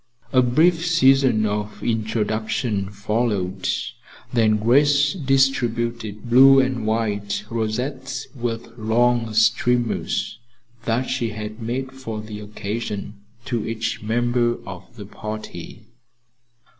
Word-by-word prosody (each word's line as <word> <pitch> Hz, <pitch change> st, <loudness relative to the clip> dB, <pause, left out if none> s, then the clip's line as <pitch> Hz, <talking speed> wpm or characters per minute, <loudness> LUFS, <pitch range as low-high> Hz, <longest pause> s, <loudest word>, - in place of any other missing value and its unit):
A 130 Hz, -, +6 dB
brief 160 Hz, +7 st, +3 dB
season 135 Hz, -9 st, +4 dB
of 105 Hz, 0 st, -3 dB
introduction 110 Hz, -1 st, -1 dB
followed, 100 Hz, -2 st, -1 dB, 0.6 s
then 110 Hz, -3 st, +3 dB
Grace 140 Hz, +6 st, +4 dB
distributed 120 Hz, -, 0 dB
blue 135 Hz, +3 st, +7 dB
and 130 Hz, -4 st, 0 dB
white 105 Hz, -2 st, -1 dB
rosettes 125 Hz, +4 st, -3 dB
with 115 Hz, -3 st, -4 dB
long 115 Hz, +1 st, +2 dB
streamers 120 Hz, +2 st, +1 dB, 0.5 s
that 115 Hz, +2 st, +1 dB
she 125 Hz, -3 st, -1 dB
had 110 Hz, +1 st, -7 dB
made 130 Hz, +4 st, -3 dB
for 120 Hz, -5 st, -6 dB
the 105 Hz, -1 st, -7 dB
occasion, 105 Hz, 0 st, -5 dB, 0.2 s
to 120 Hz, -3 st, -2 dB
each 115 Hz, 0 st, -3 dB
member 120 Hz, +2 st, +1 dB
of -, -, -10 dB
the -, -, -9 dB
party. 110 Hz, -1 st, -8 dB
115 Hz, 105 wpm, -22 LUFS, 110-130 Hz, 0.6 s, blue